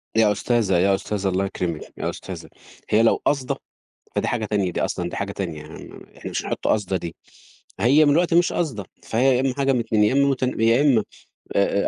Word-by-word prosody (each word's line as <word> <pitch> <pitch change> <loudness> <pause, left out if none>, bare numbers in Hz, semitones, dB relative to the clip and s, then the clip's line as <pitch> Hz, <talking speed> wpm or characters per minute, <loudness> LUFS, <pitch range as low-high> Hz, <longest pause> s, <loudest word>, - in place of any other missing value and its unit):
يا 110 -2 +4
أستاذة، 105 -3 +1
يا 95 +2 +3
أستاذة، 100 0 -3
الله 95 +1 0
يكرمِك، 85 -4 -3 0.2
يا - - -2
أستاذة، - - -8 0.4
هي 110 +2 +4
لو 115 - +5
قاصدة 135 -3 +1 0.6
فدي - - +1
حاجة 120 -3 -1
تانية 100 -4 0
دي - - -2
أصلًا 85 0 -3
دي - - -6
حاجة 100 0 -3
تانية، 85 -6 -5
يعني 75 +1 -11
م - - -13
إحنا - - -7
مش - - -2
هنحط - - -2
قاصدة 100 -3 +1
دي، 85 -2 -6 0.6
هي 135 +8 +5
من 145 - +4
الوقت 170 +2 +2
مش 175 +1 +4
قاصدة، 130 - -2 0.2
فهي 125 +3 +2
يا - - +1
إمّا 135 -1 0
حاجة 135 -1 +2
من 125 - +1
2 110 -2 +2
يا 105 - +2
إمّا 140 +1 +3
مت 135 -1 -2
يا 115 -1 +2
إمّا 125 -8 +4 0.5
آآ 100 0 +2
110 Hz, 215 wpm, -23 LUFS, 100-130 Hz, 0.6 s, لو